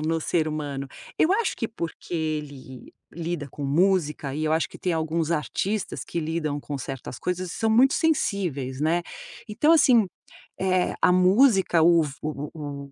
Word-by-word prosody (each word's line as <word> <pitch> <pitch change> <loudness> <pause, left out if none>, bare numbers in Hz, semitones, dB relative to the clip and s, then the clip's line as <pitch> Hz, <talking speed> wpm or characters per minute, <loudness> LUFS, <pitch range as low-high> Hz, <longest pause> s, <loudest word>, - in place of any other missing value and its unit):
no 160 +1 0
ser 160 0 0
humano. 145 -3 -4 0.3
Eu 335 - +4
acho 430 +1 0
que 230 - -2
porque 175 -4 -6
ele 150 -5 -5 0.2
lida 165 -3 -4
com 145 +2 -7
música, 150 -2 +1
e 155 +2 -2
eu 155 - +1
acho 160 +1 +1
que - - -13
tem 180 - -1
alguns 160 0 -1
artistas 195 +6 -2
que 170 - -3
lidam 155 -2 -2
com 145 -1 -5
certas 135 -2 -7
coisas 180 0 -3
e - - -7
são 225 - 0
muito 250 +5 +5
sensíveis, 175 - -1
né, 165 +3 +1 0.5
então 250 +10 +3
assim, 255 -9 +5 0.5
eh, 185 -1 +1
a - - +5
música, 190 -1 +4
o 170 0 +6
f 145 -2 -6
o 150 -1 -4
o 145 -3 -6
o 140 - -17
165 Hz, 175 wpm, -25 LUFS, 150-190 Hz, 0.5 s, o